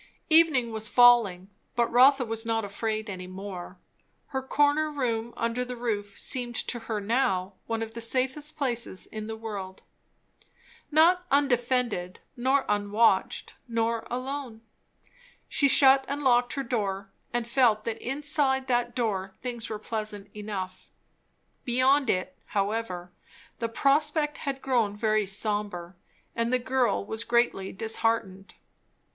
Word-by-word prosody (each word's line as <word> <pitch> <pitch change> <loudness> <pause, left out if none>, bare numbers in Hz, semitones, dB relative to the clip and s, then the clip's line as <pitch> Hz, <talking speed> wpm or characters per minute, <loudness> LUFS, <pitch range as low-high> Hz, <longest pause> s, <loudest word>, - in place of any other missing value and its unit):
Evening 310 -8 +5
was 220 -1 -3
falling, 235 -7 +5 0.3
but 240 -1 +3
Rotha 260 +2 +6
was 225 0 -3
not 225 -1 -1
afraid 215 +2 -3
any 185 -3 -6
more. 185 -1 -8 0.5
Her 265 -1 -2
corner 290 +3 +2
room 235 -5 -2
under 230 +2 -1
the 250 0 -6
roof 205 -4 -3
seemed 245 -2 -2
to 240 - -1
her 215 -2 -1
now 200 -4 0
one 225 0 -1
of 225 0 -8
the 235 - -6
safest 265 +6 -1
places 240 -9 -2
in 215 -1 -7
the 225 - -4
world. 200 -4 -7 1.1
Not 335 +4 +5
undefended, 245 -8 +1 0.2
nor 265 +2 +1
unwatched, 205 +2 +1
nor 230 -1 -1
alone. 255 -2 -5 0.9
She 280 - +3
shut 270 0 +6
and 285 +1 -3
locked 245 -2 +3
her 275 - -2
door, 200 -5 -3 0.2
and 240 -1 -2
felt 235 -4 +3
that 225 -1 -4
inside 275 0 0
that 240 -2 0
door 195 -5 -2
things 240 -3 -4
were 215 - -3
pleasant 210 -2 -5
enough. 195 -3 -6 0.7
Beyond 260 +2 +3
it, 185 0 -1
however, 195 -3 -2 0.5
the 230 - -2
prospect 295 +4 +1
had 275 -2 -4
grown 235 -6 +1
very 215 -1 +1
sombre, 200 -3 -2 0.4
and 230 +1 0
the 255 - +3
girl 250 -4 0
was 220 +2 -3
greatly 235 -5 +1
disheartened. 220 -2 -2
230 Hz, 135 wpm, -27 LUFS, 210-260 Hz, 1.1 s, Rotha